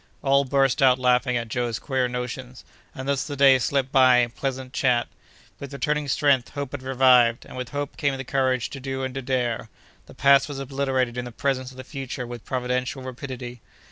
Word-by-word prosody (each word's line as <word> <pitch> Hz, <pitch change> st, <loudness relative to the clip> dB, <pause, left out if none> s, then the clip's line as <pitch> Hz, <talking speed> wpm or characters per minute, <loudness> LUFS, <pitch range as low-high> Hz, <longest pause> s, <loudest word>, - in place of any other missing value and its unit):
All 140 Hz, 0 st, +3 dB
burst 135 Hz, +1 st, +2 dB
out 130 Hz, -2 st, +5 dB
laughing 125 Hz, 0 st, +2 dB
at 115 Hz, -1 st, -3 dB
Joe's 120 Hz, -1 st, -2 dB
queer 130 Hz, -3 st, -1 dB
notions, 125 Hz, +1 st, -6 dB, 0.3 s
and 130 Hz, +1 st, -6 dB
thus 140 Hz, -2 st, 0 dB
the 145 Hz, -, -6 dB
day 135 Hz, -1 st, +6 dB
slipped 135 Hz, +1 st, 0 dB
by 130 Hz, -2 st, +6 dB
in 120 Hz, -1 st, +2 dB
pleasant 130 Hz, 0 st, -4 dB
chat. 125 Hz, -2 st, +1 dB, 0.5 s
With 140 Hz, -, -8 dB
returning 150 Hz, +1 st, -1 dB
strength, 135 Hz, -2 st, +2 dB
hope 140 Hz, -2 st, -5 dB
had 140 Hz, -, -6 dB
revived, 125 Hz, -2 st, +4 dB
and -, -, -12 dB
with 125 Hz, -1 st, -5 dB
hope 145 Hz, -1 st, -5 dB
came 140 Hz, -3 st, 0 dB
the 135 Hz, -, -5 dB
courage 130 Hz, -2 st, 0 dB
to 140 Hz, -, -7 dB
do 135 Hz, 0 st, -4 dB
and 130 Hz, -1 st, -3 dB
to 135 Hz, -, -4 dB
dare. 120 Hz, -3 st, -2 dB, 0.4 s
The -, -, -14 dB
past 140 Hz, +2 st, +4 dB
was 145 Hz, -, -5 dB
obliterated 135 Hz, -2 st, -1 dB
in 125 Hz, -, -4 dB
the 120 Hz, -, -7 dB
presence 130 Hz, 0 st, -2 dB
of 130 Hz, -, -15 dB
the 130 Hz, -, -7 dB
future 135 Hz, -2 st, -6 dB
with 120 Hz, -1 st, -9 dB
providential 125 Hz, +1 st, -2 dB
rapidity. 125 Hz, -2 st, -7 dB
130 Hz, 205 wpm, -24 LUFS, 125-135 Hz, 0.5 s, day